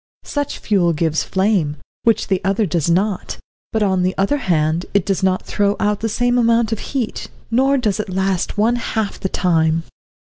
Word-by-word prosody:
Such 290 -1 -3
fuel 180 -5 +1
gives 160 0 0
flame, 190 -7 0 0.3
which 230 -2 +3
the 190 -2 0
other 200 +3 +1
does 170 -2 0
not; 190 +3 0 0.3
but, 220 -2 +1
on 190 -2 +1
the 185 +1 0
other 200 +9 +1
hand, 165 - 0
it 200 - +3
does 195 -2 0
not 185 -1 +1
throw 205 0 +1
out 210 0 +1
the 225 - -2
same 245 +2 +1
amount 230 -1 +3
of 225 - -1
heat, 255 -6 -4 0.2
nor 270 +4 +3
does 215 -5 0
it 210 - -3
last 190 0 -1
one 230 +3 +2
half 220 -3 -2
the 190 - -2
time. 165 -3 +1
200 Hz, 185 wpm, -19 LUFS, 180-225 Hz, 0.3 s, which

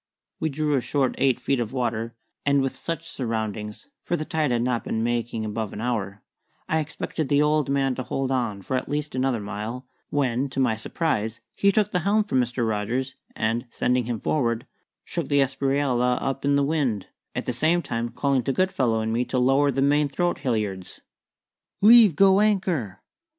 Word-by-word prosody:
We 160 - 0
drew 150 +1 -1
a 135 - +2
short 135 0 0
eight 130 -3 +3
feet 135 -2 0
of 120 0 -3
water, 115 -2 -2 0.3
and 140 -1 +3
with 135 0 -2
such 165 +4 -5
soundings 110 - -4
(for 175 - -1
the 155 - -4
tide 155 -2 0
had 120 -1 +1
not 125 -2 0
been 110 - -2
making 120 -1 -1
above 110 0 -3
an - - -6
hour) 105 -4 -3 0.4
I 160 - +1
expected 155 -1 -4
the 145 0 +4
old 150 -2 +2
man 135 -1 +1
to 130 - -4
hold 135 +2 -2
on 115 -7 -1
for 130 - -2
at 130 - -2
least 150 +1 -2
another 130 -2 0
mile, 105 +5 -5 0.2
when, 135 -1 0
to 135 - -4
my 125 -4 +2
surprise, 110 -2 -2 0.2
he 200 - +4
took 210 0 +1
the 180 - +1
helm 205 +5 +2
from 130 -11 +1
Mr. 120 -1 -1
Rogers 115 +5 -1 0.2
and, 115 +3 -1
sending 125 +1 0
him 120 -2 -3
forward, 115 -4 0 0.4
shook - - -3
the 145 - +2
Espriella 135 -2 +1
up 135 0 -3
in 140 0 +3
the 140 - +3
wind, 140 -10 -1 0.3
at - - -3
the 125 - -1
same 165 +7 +2
time 115 0 -2
calling 130 +2 +1
to 130 - -1
Goodfellow 135 -9 +1
and 110 0 -1
me 120 +2 +1
to 130 - -2
lower 135 +3 +3
the 135 0 +1
main 145 +1 +3
throat 175 +5 -1
halliards. 105 -7 -3 0.8
"Leave 215 -4 +7
go 195 +3 +5
anchor!" 185 - 0
130 Hz, 190 wpm, -25 LUFS, 115-145 Hz, 0.8 s, Leave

